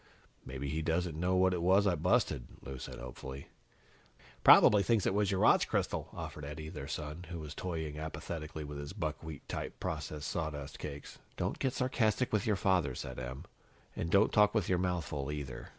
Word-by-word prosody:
"Maybe 70 Hz, +2 st, -5 dB
he 80 Hz, +3 st, -1 dB
doesn't 80 Hz, +1 st, 0 dB
know 90 Hz, +3 st, +1 dB
what 95 Hz, 0 st, +4 dB
it 90 Hz, -, -1 dB
was 95 Hz, +4 st, +5 dB
I 95 Hz, -, +4 dB
busted," 70 Hz, -6 st, +1 dB, 0.2 s
Lou 65 Hz, -2 st, -7 dB
said -, -, -7 dB
hopefully. 65 Hz, +2 st, -8 dB, 0.9 s
"Probably 105 Hz, -1 st, +8 dB
thinks 110 Hz, -1 st, +2 dB
it -, -, +2 dB
was 100 Hz, -1 st, +2 dB
your 95 Hz, -1 st, +1 dB
watch -, -, +5 dB
crystal," -, -, -1 dB
offered 75 Hz, -, -7 dB
Eddie, 75 Hz, +2 st, -6 dB
their 70 Hz, -, -7 dB
son, 75 Hz, +3 st, -5 dB
who 85 Hz, -1 st, -5 dB
was 75 Hz, -2 st, -7 dB
toying 80 Hz, -4 st, -4 dB
apathetically 80 Hz, 0 st, -5 dB
with 75 Hz, 0 st, -6 dB
his 70 Hz, +3 st, -6 dB
buckwheat 80 Hz, -5 st, -5 dB
type -, -, -5 dB
processed 75 Hz, -1 st, -4 dB
sawdust 75 Hz, -4 st, -4 dB
cakes. 70 Hz, 0 st, -7 dB, 0.2 s
"Don't -, -, -2 dB
get 130 Hz, -1 st, 0 dB
sarcastic 125 Hz, -2 st, +1 dB
with 105 Hz, +2 st, +1 dB
your 105 Hz, -, +3 dB
father," 90 Hz, -9 st, +2 dB
said -, -, -6 dB
Em, 65 Hz, +1 st, -6 dB, 0.5 s
"and 85 Hz, -, -2 dB
don't 100 Hz, +4 st, +4 dB
talk 105 Hz, 0 st, +5 dB
with 105 Hz, -5 st, +2 dB
your 90 Hz, -2 st, +2 dB
mouth 90 Hz, -3 st, 0 dB
full, 70 Hz, 0 st, -3 dB
either." 70 Hz, -3 st, -6 dB
80 Hz, 190 wpm, -33 LUFS, 75-95 Hz, 0.9 s, Probably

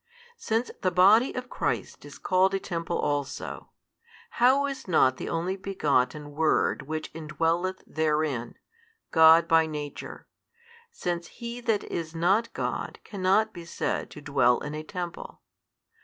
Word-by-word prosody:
Since 225 Hz, +3 st, -1 dB
the 185 Hz, -, +2 dB
Body 200 Hz, +8 st, +5 dB
of 250 Hz, 0 st, -4 dB
Christ -, -, -3 dB
is -, -, -11 dB
called 190 Hz, +1 st, +2 dB
a -, -, 0 dB
temple 170 Hz, -3 st, -3 dB
also, 145 Hz, -1 st, -3 dB, 0.7 s
how 265 Hz, +3 st, +5 dB
is 275 Hz, -4 st, -5 dB
not 130 Hz, -7 st, +3 dB
the -, -, -5 dB
Only 175 Hz, +3 st, -1 dB
Begotten 150 Hz, -7 st, -1 dB
Word 155 Hz, +1 st, +1 dB
Which 155 Hz, 0 st, -4 dB
indwelleth 165 Hz, +4 st, -1 dB
therein, 150 Hz, -6 st, -1 dB, 0.6 s
God 160 Hz, 0 st, +7 dB
by 165 Hz, -1 st, +4 dB
Nature, 150 Hz, -2 st, -7 dB, 0.6 s
since 175 Hz, -, -4 dB
he 235 Hz, +1 st, -7 dB
that 225 Hz, -3 st, 0 dB
is 165 Hz, -1 st, -5 dB
not 195 Hz, +8 st, +2 dB
God -, -, -3 dB
cannot 200 Hz, +2 st, +1 dB
be 175 Hz, -3 st, -9 dB
said 170 Hz, -, -3 dB
to 150 Hz, -, -11 dB
dwell 130 Hz, -4 st, +3 dB
in 150 Hz, -, -5 dB
a 155 Hz, -, -4 dB
|164 155 Hz, -, -16 dB
Temple? 175 Hz, -3 st, -6 dB
170 Hz, 140 wpm, -27 LUFS, 155-195 Hz, 0.7 s, God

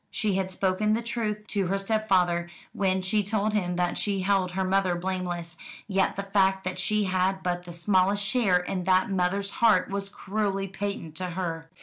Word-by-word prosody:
She 210 Hz, 0 st, -1 dB
had 190 Hz, 0 st, 0 dB
spoken 190 Hz, +3 st, +1 dB
the 230 Hz, +2 st, 0 dB
truth 215 Hz, -3 st, -3 dB
to 200 Hz, -3 st, 0 dB
her 195 Hz, +2 st, 0 dB
stepfather 190 Hz, -5 st, +1 dB, 0.2 s
when 190 Hz, -1 st, 0 dB
she 210 Hz, +3 st, +2 dB
told 210 Hz, +1 st, -1 dB
him 180 Hz, -4 st, 0 dB
that 175 Hz, 0 st, 0 dB
she 200 Hz, -2 st, -1 dB
held 185 Hz, -2 st, +1 dB
her 190 Hz, +1 st, 0 dB
mother 190 Hz, -1 st, +2 dB
blameless; 175 Hz, -2 st, -4 dB, 0.3 s
yet 195 Hz, -2 st, +1 dB
the 200 Hz, -, -3 dB
fact 195 Hz, -1 st, +2 dB
that 185 Hz, 0 st, -3 dB
she 210 Hz, +3 st, +1 dB
had 190 Hz, 0 st, 0 dB
but 175 Hz, 0 st, -2 dB
the 175 Hz, -, -8 dB
smallest 190 Hz, +3 st, +2 dB
share 200 Hz, -4 st, +3 dB
in 180 Hz, 0 st, -3 dB
that 185 Hz, +1 st, +3 dB
mother's 195 Hz, +2 st, 0 dB
heart 210 Hz, -5 st, +4 dB
was 200 Hz, 0 st, -3 dB
cruelly 195 Hz, -1 st, -2 dB
patent 195 Hz, -4 st, -5 dB
to 185 Hz, -, -2 dB
her. 165 Hz, -2 st, -4 dB
190 Hz, 190 wpm, -27 LUFS, 180-200 Hz, 0.3 s, heart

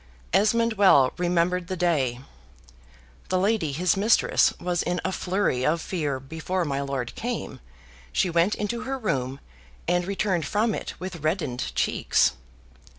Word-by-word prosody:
Esmond 230 Hz, +4 st, +3 dB
well 140 Hz, -10 st, +6 dB
remembered 175 Hz, 0 st, +1 dB
the 185 Hz, -1 st, -4 dB
day. 140 Hz, -9 st, +1 dB, 1.1 s
The 185 Hz, -, +2 dB
lady 195 Hz, -4 st, +1 dB
his 170 Hz, +5 st, +1 dB
mistress 210 Hz, +4 st, +3 dB
was 175 Hz, -1 st, -1 dB
in 180 Hz, 0 st, -1 dB
a 190 Hz, -, 0 dB
flurry 185 Hz, -9 st, 0 dB
of 160 Hz, +5 st, +2 dB
fear: 150 Hz, -6 st, -2 dB
before 160 Hz, +6 st, -3 dB
my 140 Hz, -2 st, -1 dB
lord 135 Hz, -3 st, -3 dB
came, 240 Hz, 0 st, -4 dB, 0.5 s
she 65 Hz, -, +2 dB
went 170 Hz, +4 st, +2 dB
into 235 Hz, +3 st, -3 dB
her 265 Hz, +2 st, -3 dB
room, 135 Hz, -, -2 dB, 0.5 s
and 175 Hz, +1 st, +1 dB
returned 190 Hz, -5 st, -1 dB
from 215 Hz, +5 st, +1 dB
it -, -, -5 dB
with 185 Hz, -1 st, -5 dB
reddened 155 Hz, -6 st, -2 dB
cheeks. -, -, +2 dB
180 Hz, 145 wpm, -25 LUFS, 145-195 Hz, 1.1 s, well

